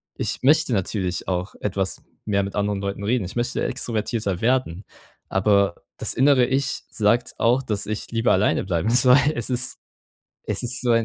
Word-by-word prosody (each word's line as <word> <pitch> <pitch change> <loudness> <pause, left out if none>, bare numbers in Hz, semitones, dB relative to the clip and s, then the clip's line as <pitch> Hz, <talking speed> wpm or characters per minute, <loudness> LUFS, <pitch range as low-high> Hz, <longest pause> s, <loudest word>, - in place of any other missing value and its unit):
Ich - - -3
möchte 135 -2 +4
natürlich 95 -3 -2
auch 90 +1 -2
etwas 95 -2 -2 0.2
mehr 100 -2 +1
mit 100 - -6
anderen 105 -1 -1
Leuten 100 0 -4
reden. 110 0 0
Ich 90 - -8
möchte 120 0 -1
extrovertierter 110 -6 -2
werden, 115 -7 0 0.4
aber 100 -1 +1
das - - +2
innere 135 -1 +4
Ich 135 +1 -1
sagt 110 +3 +1
auch, 120 +3 +3
dass 105 -5 -1
ich 110 0 -5
lieber 115 +1 +1
alleine 95 +3 +2
bleiben 90 +2 -1
soll. 125 +2 +6
soll. 150 +2 +2
Es 120 - -2
ist 125 +1 -1 0.7
es - - -2
ist 125 +1 -4
so 125 - +1
ein 115 0 +3
110 Hz, 180 wpm, -23 LUFS, 100-125 Hz, 0.7 s, soll